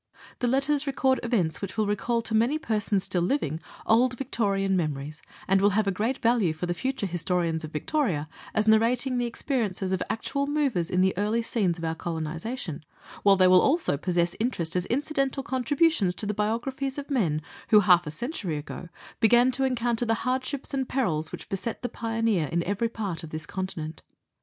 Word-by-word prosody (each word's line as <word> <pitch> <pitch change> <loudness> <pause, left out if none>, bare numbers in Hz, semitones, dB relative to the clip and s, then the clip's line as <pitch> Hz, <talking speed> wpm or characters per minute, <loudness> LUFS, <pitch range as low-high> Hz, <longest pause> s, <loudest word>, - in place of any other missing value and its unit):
The 245 - +1
letters 275 +3 +1
record 265 -1 +2
events 200 -10 0
which 195 0 -5
will 215 - +2
recall 230 +3 0
to 225 - -4
many 235 +7 +3
persons 210 -8 0
still 185 -2 -1
living 170 - 0 0.3
old 245 +2 +3
Victorian 200 -6 0
memories, 150 -3 -3 0.3
and 195 0 +3
will 205 - +5
have 215 - +3
a 195 - +1
great 220 +7 -1
value 225 -8 +2
for 160 +3 -4
the 175 - -1
future 260 +3 -2
historian 175 -2 0
of 155 -1 -6
Victoria, 165 - -1 0.3
as 215 0 +2
narrating 245 +4 +3
the 240 - 0
experiences 220 -7 -2
of 190 - 0
actual 280 +5 -2
movers 275 - 0
in 180 - +2
the 190 0 +2
early 215 +3 +1
scenes 195 -7 0
of 165 - -8
our 160 - 0
colonization, 165 - -4 0.4
while 200 -1 +6
they 185 -1 +4
will 185 0 +7
also 305 - +2
possess 175 +2 0
interest 180 -9 -1
as 180 0 0
incidental 275 0 -1
contributions 260 - +1
to 210 - -4
the 210 - -1
biographies 255 +6 -2
of 285 - -4
the - - -1
men 170 - +1 0.3
who 210 -1 +7
half 180 -3 +5
a - - -1
century 180 - -3
ago 155 +3 -7 0.3
began 240 +3 +5
to 265 +1 +1
encounter 240 -2 0
the 225 - +3
hardships 260 +3 -2
and 265 -2 -1
perils 160 - 0
which - - -8
beset 205 +5 -4
the - - 0
pioneer 225 -7 0
in 170 +3 0
every 205 +5 -1
part 200 -7 -4
of 160 - -7
this 155 0 -5
continent. 165 -4 -5
210 Hz, 190 wpm, -27 LUFS, 175-250 Hz, 0.4 s, will